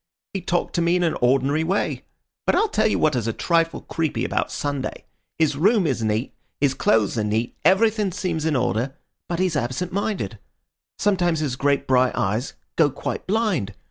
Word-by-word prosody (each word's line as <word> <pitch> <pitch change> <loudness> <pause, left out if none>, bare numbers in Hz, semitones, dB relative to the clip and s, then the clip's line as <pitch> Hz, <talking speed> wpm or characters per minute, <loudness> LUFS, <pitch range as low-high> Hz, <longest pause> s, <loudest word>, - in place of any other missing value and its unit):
He 195 - -2
talked 175 0 -1
to 170 - +1
me 170 +1 +3
in 180 - +2
an 165 - +1
ordinary 135 +5 +2
way. 190 +5 -1 0.4
But - - +4
I'll 435 - +3
tell 215 - +2
you 215 - +1
what 155 -3 +2
is 120 -2 -1
a 115 - 0
trifle 165 +3 +1
creepy 150 -7 -2
about - - -1
Sunday. 145 -2 -3 0.3
His 155 -3 +2
room 200 +6 +3
is 135 -6 0
neat, 110 +3 -1 0.3
his 140 -2 +2
clothes 110 -2 +2
are - - +1
neat, 110 +3 -1
everything 205 +3 +3
seems 170 -4 -2
in 160 -2 +1
order; 125 +2 0 0.3
but 170 - -1
he's 185 -3 +1
absent 145 +8 -2
minded. 185 - -2 0.6
Sometimes 175 -5 +1
his 140 -5 -1
great 140 0 +1
bright 130 -1 +3
eyes 110 +7 -1 0.2
go 155 -3 +5
quite 140 - -5
blind. 185 - 0
155 Hz, 185 wpm, -23 LUFS, 125-180 Hz, 0.6 s, go